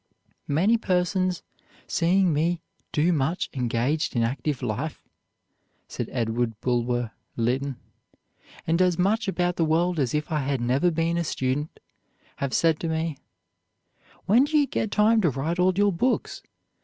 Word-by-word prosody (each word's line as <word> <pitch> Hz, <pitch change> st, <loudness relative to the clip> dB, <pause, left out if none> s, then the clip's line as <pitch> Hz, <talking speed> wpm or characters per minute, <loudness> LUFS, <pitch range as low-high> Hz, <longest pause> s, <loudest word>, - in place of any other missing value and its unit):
"Many 190 Hz, +11 st, +3 dB
persons 185 Hz, -2 st, 0 dB, 0.4 s
seeing 180 Hz, +1 st, +2 dB
me 165 Hz, +3 st, +1 dB, 0.4 s
so 160 Hz, +3 st, +3 dB
much 160 Hz, +2 st, -1 dB
engaged 130 Hz, +5 st, -1 dB
in 115 Hz, -, +2 dB
active 135 Hz, +3 st, -2 dB
life," 125 Hz, +7 st, -3 dB, 0.8 s
said -, -, -5 dB
Edward 115 Hz, -1 st, -1 dB
Bulwer 120 Hz, -1 st, 0 dB, 0.3 s
Lytton, 130 Hz, +4 st, 0 dB, 0.9 s
"and 165 Hz, +3 st, +1 dB
as 180 Hz, -2 st, +3 dB
much 210 Hz, +5 st, +1 dB
about 180 Hz, -2 st, 0 dB
the 165 Hz, -, +2 dB
world 165 Hz, +2 st, +1 dB
as 130 Hz, -1 st, 0 dB
if 150 Hz, +2 st, -2 dB
I 155 Hz, -, +1 dB
had 140 Hz, -1 st, -1 dB
never 130 Hz, +9 st, +2 dB
been 165 Hz, +1 st, 0 dB
a -, -, 0 dB
student, 145 Hz, 0 st, -2 dB, 0.6 s
have 140 Hz, -2 st, -2 dB
said 165 Hz, -2 st, +3 dB
to 165 Hz, -, -3 dB
me, 160 Hz, -2 st, -2 dB, 1.1 s
'When 235 Hz, +7 st, +5 dB
do 305 Hz, +1 st, +1 dB
you 290 Hz, -, +4 dB
get 220 Hz, -, -2 dB
time 220 Hz, +2 st, +3 dB
to 175 Hz, -, +3 dB
write 150 Hz, +7 st, -2 dB
all 185 Hz, +1 st, +3 dB
your 205 Hz, -1 st, +3 dB
books? 250 Hz, +10 st, -1 dB
160 Hz, 150 wpm, -25 LUFS, 135-180 Hz, 1.1 s, When